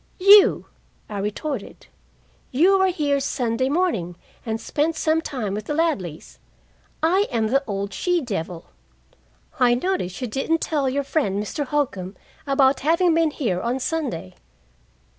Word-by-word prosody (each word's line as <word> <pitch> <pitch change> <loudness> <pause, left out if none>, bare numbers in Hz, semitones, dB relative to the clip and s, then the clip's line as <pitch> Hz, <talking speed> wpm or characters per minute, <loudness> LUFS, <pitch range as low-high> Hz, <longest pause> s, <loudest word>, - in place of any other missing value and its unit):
"You!" 400 +2 +7 0.4
I 205 -2 -4
retorted. 210 +4 -5 0.6
"You 365 +9 +4
were 380 - +4
here 295 -6 0
Sunday 260 -2 -1
morning 275 - 0 0.3
and 225 -2 -3
spent 305 +7 -1
some 320 0 +1
time 250 -11 -4
with 210 0 -4
the 295 - -3
Ladleys. 205 - -2 0.6
I 375 +6 +3
am 225 -2 0
the 275 +4 +2
old 200 -1 -3
she 355 -1 0
devil. 180 - -5 0.9
I 245 -1 +4
notice 250 - -2
you 255 - -2
didn't 270 +7 -1
tell 290 -5 0
your 280 +2 -1
friend, 235 -9 -1
Mr. 285 +7 -4
Holcombe, 205 -10 -2 0.3
about 275 -1 +3
having 335 +4 +2
been 325 -1 +3
here 225 -12 -2
on 245 +3 -1
Sunday." 260 - -3
270 Hz, 140 wpm, -23 LUFS, 215-320 Hz, 0.9 s, You